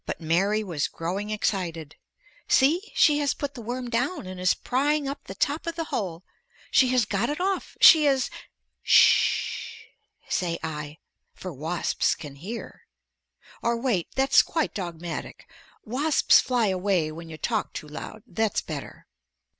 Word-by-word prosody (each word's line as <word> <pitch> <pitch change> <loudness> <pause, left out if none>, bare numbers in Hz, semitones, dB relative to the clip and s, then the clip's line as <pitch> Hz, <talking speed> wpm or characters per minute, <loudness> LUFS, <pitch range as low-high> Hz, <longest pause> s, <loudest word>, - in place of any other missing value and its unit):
But - - -4
Mary 190 +6 +1
was 165 -7 -2
growing 190 +5 -4
excited. 175 -7 -2 0.5
"See, 335 +11 +3
she 295 -2 +5
has 285 -1 0
put 285 -1 -4
the 250 - -8
worm 245 +2 -4
down 250 - -1
and 185 0 -8
is 180 0 +3
prying 285 +3 0
up 280 +1 -6
the - - -8
top 295 +4 -1
of 335 - -2
the 335 - -2
hole. 175 -4 -3 0.5
She 260 - +5
has 250 -3 +2
got 205 +3 -1
it 295 - -3
off. 385 +1 -2
She 310 -2 +9
is 270 -2 +1 0.2
" - - -54
"Ss - - -11 0.9
h," - - -17 0.4
say 170 -3 -1
I, 150 -1 -5 0.4
for 185 -2 -7
wasps 160 +5 -1
can 145 -3 -10
hear. 210 +10 -8 0.7
Or, 235 0 0
wait; 230 -9 0
that's 270 +1 +5
quite 320 -2 -2
dogmatic. 175 -4 -6 0.4
Wasps 280 +7 +4
fly 245 -3 +1
away 185 -4 0
when 165 +1 -9
you 155 - -8
talk 220 +5 -2
too 155 - -7
loud. 180 +8 -8
That's 220 -2 -1
better. - - -8
215 Hz, 160 wpm, -26 LUFS, 170-270 Hz, 0.9 s, She